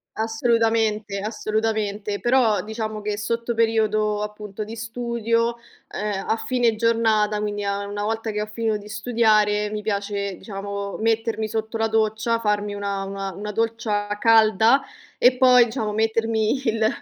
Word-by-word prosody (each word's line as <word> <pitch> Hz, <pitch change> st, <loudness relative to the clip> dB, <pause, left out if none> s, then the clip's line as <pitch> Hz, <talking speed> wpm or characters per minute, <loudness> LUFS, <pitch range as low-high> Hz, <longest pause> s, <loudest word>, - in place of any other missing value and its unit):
Assolutamente, 225 Hz, -2 st, +1 dB
assolutamente, 215 Hz, -1 st, -2 dB
però 240 Hz, -4 st, +3 dB
diciamo 215 Hz, 0 st, -4 dB
che 205 Hz, 0 st, -3 dB
sotto 230 Hz, +3 st, -2 dB
periodo 215 Hz, -2 st, +1 dB
appunto 210 Hz, 0 st, -6 dB
di 220 Hz, +2 st, -8 dB
studio, 230 Hz, 0 st, -1 dB, 0.3 s
ehm, 205 Hz, -1 st, -3 dB
a 220 Hz, -, +2 dB
fine 240 Hz, -2 st, +1 dB
giornata, 220 Hz, -2 st, +2 dB
quindi 205 Hz, -1 st, -3 dB
a 200 Hz, 0 st, -2 dB
una 205 Hz, 0 st, -5 dB
volta 225 Hz, +1 st, -2 dB
che 210 Hz, 0 st, -2 dB
ho 210 Hz, -, -3 dB
finito 220 Hz, -1 st, -1 dB
di 210 Hz, +1 st, -12 dB
studiare, 215 Hz, -2 st, +2 dB
mi 210 Hz, 0 st, -5 dB
piace 200 Hz, -2 st, -2 dB
diciamo, 200 Hz, -1 st, -5 dB
mettermi 225 Hz, 0 st, 0 dB
sotto 220 Hz, +1 st, -3 dB
la 225 Hz, 0 st, +1 dB
doccia, 220 Hz, +1 st, +1 dB
farmi 210 Hz, -2 st, 0 dB
una 200 Hz, -1 st, -3 dB
una 195 Hz, 0 st, -4 dB
una 210 Hz, +1 st, -5 dB
doccia 225 Hz, -1 st, -1 dB
calda 225 Hz, +3 st, +5 dB, 0.4 s
e 250 Hz, +1 st, +5 dB
poi 250 Hz, -2 st, +6 dB
diciamo, 220 Hz, -3 st, -3 dB
mettermi 225 Hz, +3 st, 0 dB
il 220 Hz, -1 st, +2 dB
220 Hz, 145 wpm, -23 LUFS, 210-225 Hz, 0.4 s, poi